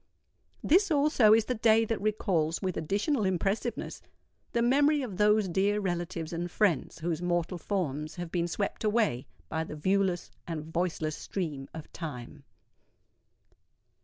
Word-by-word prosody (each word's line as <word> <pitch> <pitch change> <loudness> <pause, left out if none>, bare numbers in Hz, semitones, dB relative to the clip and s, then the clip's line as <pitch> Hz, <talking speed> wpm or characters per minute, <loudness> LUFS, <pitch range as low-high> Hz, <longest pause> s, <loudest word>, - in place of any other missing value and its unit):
This 380 +6 +4
also 285 -7 +4
is 220 0 +5
the 250 - -1
day 225 -1 +4
that 225 -2 -2
recalls, 180 -6 0
with 185 -3 -2
additional 205 - 0
impressiveness, 195 +5 -1 0.5
the 235 - +1
memory 285 +4 +3
of 205 -8 -6
those 210 0 +4
dear 195 +4 +1
relatives 175 -3 -3
and 175 +1 -3
friends 180 -6 +1
whose 165 0 -2
mortal 175 0 -1
forms 155 -6 -2
have 175 -2 -6
been 175 -1 0
swept 200 +5 -3
away 210 - +1 0.2
by 160 0 -2
the 155 - -7
viewless 185 +2 0 0.2
and 160 -3 -4
voiceless 165 -3 -1
stream 150 -8 -4
of 160 -2 -10
Time. 145 -3 -7
185 Hz, 140 wpm, -29 LUFS, 165-215 Hz, 0.5 s, is